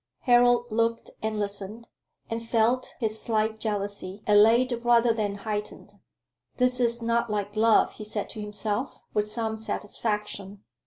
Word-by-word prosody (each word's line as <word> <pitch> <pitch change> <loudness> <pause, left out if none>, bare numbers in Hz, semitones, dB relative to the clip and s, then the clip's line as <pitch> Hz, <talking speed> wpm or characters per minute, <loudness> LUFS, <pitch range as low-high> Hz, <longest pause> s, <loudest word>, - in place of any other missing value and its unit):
Harold 245 -1 +4
looked 230 +1 0
and 220 0 -2
listened, 205 +3 -4 0.4
and 225 0 -3
felt 230 +2 +1
his 220 -2 0
slight 220 -1 0
jealousy 205 -2 -3
allayed 230 +4 +4
rather 240 -1 +4
than 210 -3 -2
heightened. 210 0 -5 0.6
"This 250 0 +2
is 235 -1 +1
not 235 0 +1
like 205 0 -3
love," 220 +1 +4
he - - -9
said 210 -1 -2
to 215 - -6
himself, 210 +3 -3 0.2
with 210 0 0
some 220 0 -1
satisfaction. 210 -2 -4
220 Hz, 140 wpm, -26 LUFS, 210-235 Hz, 0.6 s, Harold